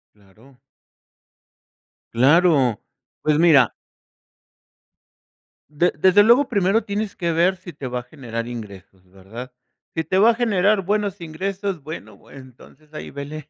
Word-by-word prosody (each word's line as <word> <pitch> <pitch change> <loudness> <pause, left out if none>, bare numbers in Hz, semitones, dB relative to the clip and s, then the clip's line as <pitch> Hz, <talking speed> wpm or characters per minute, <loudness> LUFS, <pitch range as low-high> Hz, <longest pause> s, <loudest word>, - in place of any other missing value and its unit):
Claro. 105 +6 -22 1.6
Claro. 135 - +3 0.4
Pues 150 -1 +1
mira. 155 -8 +5 2.0
De 160 +4 +1
desde 190 +5 +5
luego, 240 +6 +4
primero 200 0 +1
tienes 205 0 -4
que 170 -2 -1
ver 175 +3 +2
si 180 -1 -11
te 140 -3 -8
va 125 0 -3
a - - -10
generar 120 -4 -7
ingresos, 100 -5 -10
¿verdad? 110 +7 -11 0.4
Si 160 - -1
te 185 +5 0
va 220 +4 +6
a - - +1
generar 210 -3 +1
buenos 205 0 -1
ingresos, 190 +2 -4
bueno, 155 +4 -10
entonces 135 +3 -16
ahí 155 - -8
vele 145 +2 -8
155 Hz, 130 wpm, -21 LUFS, 125-195 Hz, 2.0 s, va